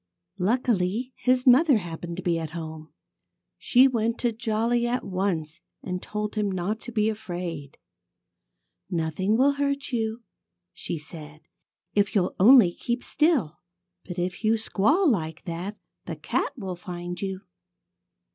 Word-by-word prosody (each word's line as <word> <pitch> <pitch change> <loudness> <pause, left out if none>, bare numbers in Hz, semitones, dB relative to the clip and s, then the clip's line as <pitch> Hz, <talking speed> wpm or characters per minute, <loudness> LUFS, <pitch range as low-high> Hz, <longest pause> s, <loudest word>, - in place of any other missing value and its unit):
Luckily, 225 +2 0
his 255 0 +1
mother 270 +1 +6
happened 170 -2 -6
to 185 - -5
be 170 -2 +1
at 160 +1 -5
home. 160 -1 -7 0.7
She 255 +2 +5
went 230 -2 0
to 240 - +2
Jolly 230 +1 0
at 245 +1 -1
once 185 -5 -2 0.2
and 180 -1 -4
told 210 0 -4
him 210 -2 0
not 190 +4 -2
to 240 - -8
be 215 -2 +1
afraid. 175 -9 -5 1.1
"Nothing 180 +4 0
will 270 +3 +5
hurt 280 0 -1
you," 225 -1 -2 0.5
she - - -4
said, 155 0 -10 0.5
"if 205 +2 +1
you'll 185 -3 +2
only 215 -3 +8
keep 240 +5 -3
still. 300 - +1 0.4
But 180 -1 -8
if 180 +3 -3
you 220 +1 +3
squall 225 - +2
like 165 - 0
that, 180 +4 -5 0.3
the - - -3
cat - - -1
will 190 -6 -4
find 175 -1 -6
you." 190 -1 -3
200 Hz, 140 wpm, -26 LUFS, 175-235 Hz, 1.1 s, only